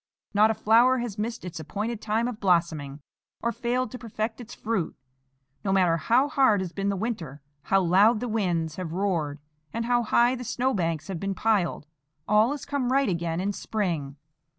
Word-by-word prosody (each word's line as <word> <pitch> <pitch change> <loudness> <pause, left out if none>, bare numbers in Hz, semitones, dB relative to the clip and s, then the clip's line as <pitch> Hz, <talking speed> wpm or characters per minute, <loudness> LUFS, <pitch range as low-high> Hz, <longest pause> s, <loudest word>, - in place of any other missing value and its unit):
Not 210 +2 +5
a 220 - +1
flower 235 +5 +4
has 235 -4 -4
missed 230 -1 -3
its 175 -2 -6
appointed 210 +8 -4
time 225 +2 0
of 240 -3 -5
blossoming, 160 -7 0 0.4
or 235 - +1
failed 245 0 -1
to 250 - -7
perfect 220 0 -4
its 240 0 -10
fruit. 220 -7 -2 0.7
No 195 - 0
matter 180 -4 +3
how 245 - +3
hard 265 -8 +3
has 185 -2 -3
been 195 0 -1
the 200 - 0
winter, 175 - -4 0.2
how 195 0 +3
loud 200 +6 +4
the 245 - -3
winds 175 -8 -1
have 175 -3 -4
roared, 170 -7 -1 0.3
and 230 0 -3
how 240 0 +2
high 240 +2 +3
the 250 -1 -5
snow 250 +3 0
banks 165 -4 -1
have 190 -4 -4
been 195 +1 -2
piled, 205 -9 0 0.4
all 210 +2 +4
has 290 -1 -4
come 280 -3 -1
right 275 -2 +3
again 170 -1 -1
in 200 +2 -1
spring. 170 -12 -2
210 Hz, 190 wpm, -26 LUFS, 175-235 Hz, 0.7 s, Not